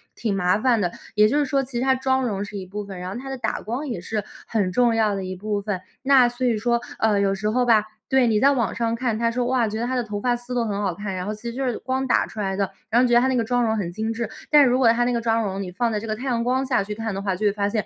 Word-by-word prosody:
挺 215 -4 -1
麻 180 0 +2
烦 235 0 +2
的， 175 - 0 0.2
也 210 +1 +5
就 285 - +1
是 295 - +2
说 275 0 +1
其 265 -1 -9
实 - - 0
她 265 0 +4
妆 260 0 +1
容 205 -4 -2
是 205 0 -7
一 190 - -6
部 205 +3 -6
分， 195 -2 -8
然 180 +1 -5
后 240 - -5
她 270 - -8
的 265 - -4
打 225 -3 -2
光 250 +7 -4
也 215 -9 -4
是 210 +2 -3 0.2
很 200 -5 0
重 235 +2 +3
要 215 -2 +2
的 195 -1 -3
一 185 0 -5
部 205 +2 -2
分。 195 -3 -3 0.2
那 265 -2 +5
所 250 +1 -2
以 230 -3 +2
说， 235 +2 +1 0.2
呃， 215 -2 +2
有 195 -1 +2
时 210 +2 -1
候 250 +1 +2
吧 220 -3 +5 0.2
对， 265 -1 +3
你 220 -3 +2
在 275 +2 +5
网 235 -7 0
上 230 0 -1
看 235 -2 -1
她， 230 0 +2
说： 245 +1 -1
“哇。” 245 -3 +2
觉 220 +1 -4
得 235 - -1
她 255 +1 -2
的 245 - 0
头 210 -2 -4
发 245 -1 +2
丝 245 +1 -6
都 240 - +1
很 205 -1 -2
好 190 -4 0
看， 205 -1 -5
然 180 -1 -4
后 210 - -2
其 215 - -11
实 - - -6
就 265 +1 -2
是 245 - -1
光 260 +1 -2
打 - - +3
出 215 - -10
来 195 -1 -1
的， 195 -1 -1 0.2
然 235 +2 +3
后 255 - +4
觉 240 - +1
得 240 - +7
她 260 - +2
那 260 - +1
个 235 - +2
妆 245 +2 +1
容 220 -1 +1
很 175 -4 -3
精 220 +4 -3
致， 230 -1 -3 0.2
但 295 -1 +7
是 265 - +4
如 250 +2 +2
果 235 -3 +6
她 240 - +1
那 245 - +1
个 235 - +1
妆 225 -1 +1
容 195 -1 -3
你 185 - -5
放 230 +5 0
在 210 - -1
这 225 - -7
个 215 - -1
太 250 - -7
阳 235 -2 0
光 260 +2 +1
下 250 -5 +1
去 210 +1 -5
看 225 -1 -3
的 195 - -4
话， 195 -2 -1
就 210 +4 -3
会 205 - +4
发 200 0 -1
现， 210 -3 -1
225 Hz, 370 characters per minute, -23 LUFS, 205-245 Hz, 0.2 s, 得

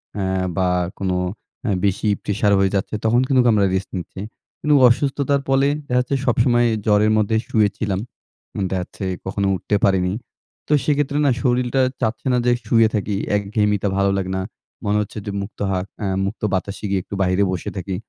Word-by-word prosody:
অ্যা 95 -2 -1 0.3
বা 95 -1 +2 0.3
কোনো 95 -2 -1 0.5
অ্যা 115 - 0
বেশি 100 +2 0 0.2
প্রেশার 105 0 +1
হয়ে 95 -1 +2
যাচ্ছে 100 +2 -1
তখন 120 +3 +4
কিন্তুক 130 -2 +3
আমরা 105 -2 +3
রেস্ট 95 0 -2
নিচ্ছি। 90 +1 -7 0.4
কিন্তু 150 0 +3
অসুস্থতার 140 +2 +1
পলে 135 +1 +3 0.2
দেখা 125 0 +2
যাচ্ছে 125 +2 -1
সবসময়ে 120 0 +3 0.2
জ্বরের 105 0 +4
মধ্যে 110 +1 +1
শুয়েছিলাম। 105 -2 0 0.7
দেখা 95 0 -1
যাচ্ছে 95 - -7 0.2
কখনো 100 +1 -1
উঠতে 95 +3 -1
পারিনি, 95 -1 +2 0.5
তো 150 - +1
সেক্ষেত্রে 145 -1 0
না 140 - +4
শরীলটা 125 0 +1 0.2
চাচ্ছে 115 +2 -2
না 125 - +3
যে 125 - +4
শুয়ে 115 +1 +4
থাকি। 105 -1 -1 0.2
একঘেয়েমিতে 105 0 0
ভালো 100 0 +3
লাগে 95 -1 -2
না। - - -1 0.4
মনে 105 +1 +2
হচ্ছে 105 - -6
যে 100 - -3
মুক্ত 100 - -9
হা 95 -1 0 0.2
আ - - 0 0.2
মুক্ত 100 +3 -5
বাতাসে 100 +3 -3
গিয়ে 95 -1 0
একটু 100 - -7
বাহিরে 95 +1 +2
বসে 90 -3 -3
থাকি। 95 0 -3
105 Hz, 175 wpm, -21 LUFS, 95-120 Hz, 0.7 s, তখন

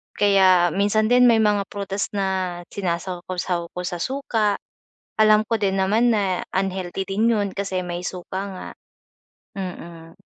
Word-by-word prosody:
Kaya 190 -3 +4
minsan 205 +2 +2
din 250 0 +6
may 225 -2 +5
mga 205 -2 +2
prutas 200 -1 -3
na 190 -3 -1
sinasawsaw 180 -1 -3
ko 180 - -4
sa 175 -1 -3
suka, 225 -5 0 0.6
alam 215 0 +6
ko 230 - +2
din 195 -1 +1
naman 225 +5 +3
na 195 -4 0
unhealthy 190 -1 -2
din 210 +4 +1
'yon 205 -3 0
kasi 195 -2 -2
may 175 0 -5
suka 185 +1 -5
nga. 190 -2 -7 0.9
Mm. 170 -3 -8
195 Hz, 140 wpm, -22 LUFS, 180-210 Hz, 0.9 s, din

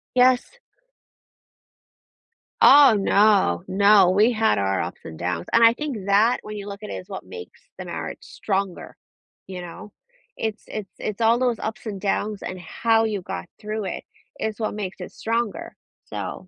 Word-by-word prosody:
Yes. 255 - +3 2.0
Oh, 275 -5 +8
no, 200 - +3
no, 200 -1 +5
we 210 +5 +4
had 220 - +2
our 95 -1 0
ups - - -6
and 80 -1 -10
downs, 85 -1 -2
and 230 - +5
I 230 - +7
think 245 -8 -5
that, 210 +5 +3
when 210 0 -8
you 205 -1 -7
look 200 +1 -8
at 210 - -7
it - - -5
is 185 - -8
what 190 - -7
makes 460 +1 -11 0.2
the - - -6
marriage - - -6
stronger, 195 -3 -4 0.5
you 185 -1 -7
know, 175 +4 -10 0.5
it's 220 -1 -4
it's 210 -3 -6
it's 215 +1 -5
all 225 +1 +4
those 245 -3 0
ups 220 +1 -5
and 205 -3 -5
downs, 205 +1 -2
and 185 0 -6
how 225 +6 +1
you 215 -3 -2
got 180 - -6
through 215 -1 -4
it, - - -5 0.4
is 220 -1 -3
what 220 - -2
makes 195 -3 -6
it - - -7
stronger. 230 -1 -3 0.3
So, 185 - -6
210 Hz, 170 wpm, -23 LUFS, 190-225 Hz, 2.0 s, Oh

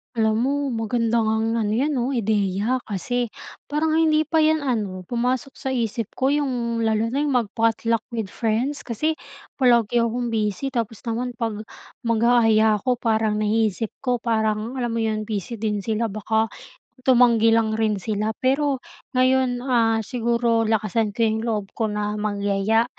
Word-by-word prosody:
Alam 220 -1 +2
mo, 260 +4 +1 0.2
maganda 230 0 0
ngang 220 +1 +1
ano 210 -1 0
yan, 280 +6 +1
'no, 255 -3 0
ideya 210 +1 0
kasi 240 +5 -2 0.4
parang 310 +2 0
hindi 310 -1 +3
pa 320 +1 +1
yan 310 -1 +3
ano 210 -8 -2
pumasok 250 +4 -1
sa - - -6
isip 230 -2 -1
ko, 265 +2 +1
'yung 245 -5 -1
lalo 220 +1 +1
na 275 - 0
'yong 295 -2 0
mag-potluck 230 0 +1 0.2
with 215 -4 -3
friends 240 +5 -1
kasi 305 +8 0 0.5
palagi 240 -2 +4
akong 235 +1 -1
busy 215 +4 -1
tapos 225 -2 -3
naman, 240 +2 -3
'pag 225 -3 -2 0.5
mag-aaya 225 -2 +4
ako, 250 +4 0
parang 220 -2 +1
naiisip 215 0 0
ko, 250 -2 +1
parang 220 0 -1
alam 240 -1 -1
mo 230 - 0
'yun, 215 -1 -1
busy 215 +2 -4
din 210 -2 -1
sila 225 +1 0
baka 220 +2 0 0.5
tumanggi 240 -3 +4
lang 225 -1 +3
rin 220 -1 +1
sila. 215 +2 -2
Pero 275 +1 +2 0.4
ngayon, 255 -1 +2
ah, 230 -3 +3
siguro 235 -1 +1
lakasan 220 0 +1
ko - - -16
'yung 220 0 0
loob 215 -4 -1
ko 225 -2 -1
na 210 0 -2
magyaya. 205 +1 +1
230 Hz, 155 wpm, -23 LUFS, 215-245 Hz, 0.5 s, palagi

